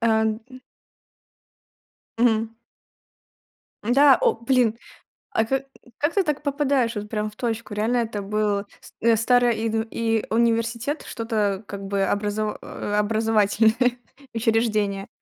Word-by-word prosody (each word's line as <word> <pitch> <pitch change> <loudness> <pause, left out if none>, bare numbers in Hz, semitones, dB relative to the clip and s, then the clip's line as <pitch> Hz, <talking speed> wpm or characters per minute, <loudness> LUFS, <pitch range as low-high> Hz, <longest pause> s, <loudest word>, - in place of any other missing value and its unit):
э. 230 - +1
Н 220 0 +2 1.8
Мгм. 225 -1 +2 1.3
Да, 275 +5 +6
о 475 -2 +4
блин, 235 -2 +1 0.5
а 225 - +1
ка 270 +3 -1 0.3
как 295 +3 0
ты 395 - +3
так 300 -3 -2
попадаешь 280 -4 +1
вот 210 0 -4
прям 215 -1 -2
в 210 - -21
точку? 230 -3 -3
Реально 225 +4 +1
это 220 -3 -2
был 205 0 0 0.2
с - - -16
э, 230 0 +4
старое 245 +2 +3
и 225 0 -2
ну 225 0 0
и 225 -1 0
университет, 230 +4 0
что-то 215 -4 -2
как 200 0 -7
бы 195 0 0
образо 210 +1 -1
э, 205 - -5
образовательное 220 +3 +2 0.4
учреждение. 215 -3 0
225 Hz, 130 wpm, -23 LUFS, 210-240 Hz, 1.8 s, Да